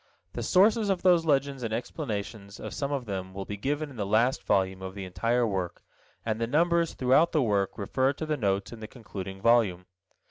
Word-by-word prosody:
The - - -4
sources 210 +3 +4
of 190 -2 0
those 175 -3 +5
legends 140 -2 +1
and 115 -2 -3
explanations 110 -4 -5
of - - -6
some 140 0 -3
of 135 -3 -2
them 95 -2 -5
will 100 0 -5
be 105 - -5
given 145 +7 -2
in 130 - -12
the 105 - -1
last 115 +5 +2
volume 95 -1 +1
of 95 0 -7
the 100 -2 -5
entire 115 +6 0
work, 95 -5 -3 0.4
and 110 0 -2
the 115 - +1
numbers 170 +4 +2
throughout 135 +7 +3
the 155 -4 +3
work 100 -4 0
refer 130 +6 +1
to 155 - -5
the 155 -1 0
notes 100 -6 -1
in 115 - -9
the 110 - -7
concluding 95 -5 -8
volume. 110 -7 +3
115 Hz, 210 wpm, -28 LUFS, 100-145 Hz, 0.4 s, those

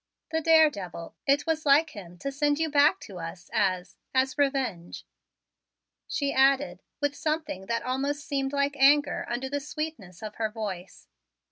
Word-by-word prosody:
"The 320 0 0
daredevil 295 - +2
it 280 +1 +3
was 320 -1 0
like 300 +2 +4
him 180 - -10
to 275 - -3
send 290 +1 +1
you 320 -1 -1
back 290 +1 +4
to 190 -3 -9
us 170 +2 -8
as 185 -2 0 0.2
as 260 0 +2
revenge," 265 - -1 1.0
she 280 -1 -1
added 265 -10 +3 0.2
with 290 -1 +1
something 305 - -3
that 230 +1 -1
almost 280 +3 -2
seemed 270 -1 -1
like 280 0 0
anger 285 +2 +4
under 245 +2 -2
the 285 +2 -2
sweetness 295 - -6
of 215 -1 -7
her 220 -1 0
voice. 200 -5 -7
275 Hz, 155 wpm, -27 LUFS, 205-290 Hz, 1.0 s, like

